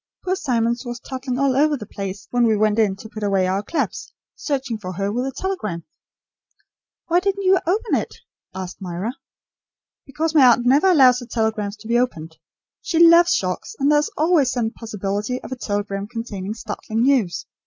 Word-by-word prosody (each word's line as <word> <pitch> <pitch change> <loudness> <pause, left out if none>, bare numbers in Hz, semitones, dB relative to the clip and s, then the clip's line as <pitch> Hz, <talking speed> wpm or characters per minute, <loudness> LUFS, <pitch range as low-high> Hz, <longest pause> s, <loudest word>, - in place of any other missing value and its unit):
Poor 370 0 +1
Simmons 235 -8 0
was 240 -1 -6
toddling 255 -1 -5
all 275 -1 +2
over 295 +1 +3
the 210 - -8
place 195 -1 -7
when 245 -1 +3
we 220 -1 +2
went 215 +1 +2
in 205 -3 +2
to 210 +3 -11
put 215 +1 -8
away 195 -2 +1
our 190 +2 0
clubs, 315 +11 -3 0.2
searching 265 -6 -3
for 185 -2 -6
her 200 +3 -2
with 250 +3 -1
a - - -3
telegram." 245 - -4 1.2
"Why 345 +1 +3
didn't 395 +1 -1
you 380 0 +4
open 420 +6 0
it?" - - -1 0.4
asked 190 +1 -7
Myra. 185 +5 -4 0.9
"Because 310 +3 -2
my 300 -4 +6
aunt 240 0 +4
never 285 +9 +4
allows 260 -8 +6
her 245 - -9
telegrams 220 -3 -2
to 215 +1 -12
be 235 +1 +2
opened. 160 -10 -3 0.4
She 345 - -2
loves 340 +1 +7
shocks; 185 -1 -2
and 280 +2 +2
there 295 - +5
is 300 - -1
always 310 -4 +3
the 230 -3 -1
possibility 210 +2 -3
of - - -9
a - - -2
telegram 205 -3 -3
containing 215 -3 -5
startling 220 0 -3
news. 235 -11 +1
235 Hz, 185 wpm, -21 LUFS, 205-280 Hz, 1.2 s, loves